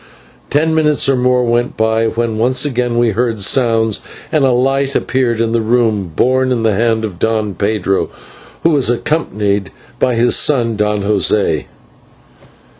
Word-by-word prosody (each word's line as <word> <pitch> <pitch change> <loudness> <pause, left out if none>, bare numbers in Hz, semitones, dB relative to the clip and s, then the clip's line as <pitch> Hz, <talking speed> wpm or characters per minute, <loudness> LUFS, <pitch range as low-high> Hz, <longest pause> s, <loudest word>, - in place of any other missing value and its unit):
Ten 160 +2 +1
minutes 150 -3 +2
or 135 - +3
more 125 0 +2
went 120 +1 -1
by, 110 0 +1
when 115 -1 -2
once 130 +5 +2
again 125 -3 -1
we 120 -1 +2
heard 115 0 -1
sounds, 115 -2 +1 0.3
and 155 -3 +2
a 130 - +3
light 135 +2 0
appeared 125 -3 0
in 115 -1 0
the 115 0 +1
room, 110 -5 0
borne 130 +1 +1
in 120 -3 0
the 110 -2 +2
hand 110 +1 0
of 90 -5 -8
Don 110 -2 -1
Pedro, 100 -1 -1 0.5
who 165 - +3
was 140 -6 +1
accompanied 105 - -1 0.3
by 125 -2 +1
his 120 +1 +2
son, 120 -6 +1
Don 105 -1 -1
José. 105 0 +1
115 Hz, 160 wpm, -15 LUFS, 110-130 Hz, 0.5 s, or